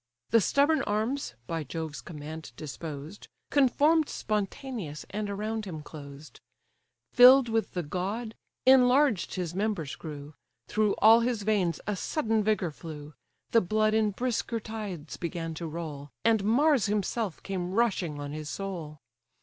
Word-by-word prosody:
The 230 - +6
stubborn 285 - +3
arms 220 - -1
(by 165 +2 -3
Jove's 155 +1 -5
command 155 -4 -8
disposed) 155 +3 -7 0.2
Conform'd 295 +3 +4
spontaneous, 210 - -3
and 210 0 -3
around 215 +2 -3
him 160 -6 -6
closed: 145 -1 -11 0.7
Fill'd 250 0 +8
with 225 0 0
the 175 - -1
god, 200 +9 -3 0.3
enlarged 260 -4 +5
his 175 -3 -3
members 195 -7 -2
grew, 150 -2 -8 0.3
Through 215 -1 +1
all 225 +2 +7
his 235 -3 -1
veins 195 -6 +1
a 210 - -1
sudden 220 0 0
vigour 200 -5 +1
flew, 150 -1 -9 0.4
The 230 - +5
blood 215 +3 +1
in 220 -1 +3
brisker 235 +1 -2
tides 205 -8 -6
began 165 -1 -4
to 165 +1 -5
roll, 155 -3 -6 0.2
And 225 -3 +4
Mars 270 +1 +4
himself 210 -1 -2
came 185 -2 -3
rushing 190 -9 +1
on 145 0 -5
his 155 0 -6
soul. 170 -6 -5
200 Hz, 140 wpm, -28 LUFS, 160-225 Hz, 0.7 s, Fill'd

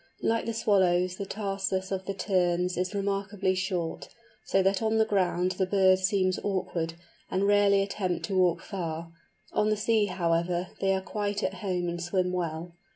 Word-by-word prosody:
Like 230 0 +1
the 230 - -1
Swallows 185 -4 +2
the 200 - -5
tarsus 195 -2 -2
of 190 -1 -2
the 195 - -3
Terns 180 -2 +1
is 185 +3 -2
remarkably 200 -1 0
short, 185 -3 -3 0.3
so 195 - +2
that 195 +2 +2
on 220 0 +1
the 220 - +4
ground 185 -3 +1
the 185 0 -1
birds 185 -1 +4
seem 190 -2 +2
awkward, 175 -4 -2 0.3
and 190 - 0
rarely 200 -1 +4
attempt 190 -3 -2
to 195 - -3
walk 180 -2 +3
far; 170 -4 -5 0.4
on 210 - +2
the 215 - +1
sea, 220 0 +2
however, 175 0 0
they 195 0 +2
are 190 - -1
quite 205 +1 -3
at - - 0
home 180 -3 -1
and 170 0 -3
swim 180 +1 0
well. 170 -1 -3
190 Hz, 175 wpm, -28 LUFS, 180-200 Hz, 0.4 s, the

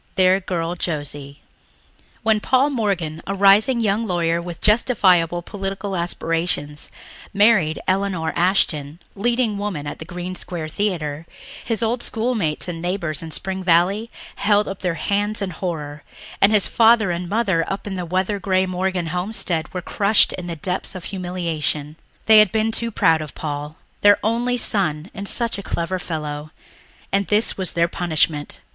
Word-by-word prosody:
Their 185 0 +4
Girl 175 -3 -2
Josie 145 -4 -4 0.8
When 220 -1 +3
Paul 260 +6 +2
Morgan, 185 - -1
a 195 - -2
rising 205 +6 +5
young 220 0 0
lawyer 170 -2 0
with 170 -1 -7
justifiable 185 -7 +3
political 195 0 -4
aspirations, 165 -3 -2 0.5
married 200 -7 +4
Elinor 185 -4 0
Ashton, 165 -4 +1 0.2
leading 235 0 0
woman 195 -8 -3
at 145 - -6
the 160 - -7
Green 180 +2 -6
Square 170 -3 -5
Theatre, 160 -5 -2 0.4
his 225 -2 -1
old 235 +2 0
schoolmates 220 -11 0
and 165 -2 -5
neighbours 175 -4 -2
back 165 - -6
in - - -8
Spring 190 +3 -4
Valley 185 +6 +2 0.3
held 205 0 +3
up 195 - -5
their 180 -3 -1
hands 205 +4 -1
in 195 -2 -3
horror, 150 -4 -5 0.4
and 195 - +6
his 210 -3 +3
father 225 -4 +4
and 175 0 -4
mother 200 -6 +1
up 195 - -4
in 205 - -4
the 180 -1 -3
weather 185 +4 -1
grey 190 -1 +1
Morgan 185 -1 -1
homestead 180 -2 -1
were 180 -1 -5
crushed 205 +3 +3
in 180 -1 -6
the 170 - -4
depths 180 +4 -3
of 185 - -7
humiliation. 170 -6 -3 0.3
They 220 -1 +8
had 215 -4 +5
been 220 0 +1
too 230 +1 0
proud 165 -7 +3
of 150 - -8
Paul... 150 0 -5 0.3
their 205 0 +7
only 240 +3 +1
son 180 -7 +1
and 200 -1 -4
such 235 -2 0
a - - -4
clever 185 0 -2
fellow... 150 -3 -5 0.6
and 195 0 +1
this 210 +2 +2
was 190 -2 -1
their 170 0 +2
punishment! 160 -4 -1
185 Hz, 165 wpm, -21 LUFS, 165-205 Hz, 0.8 s, They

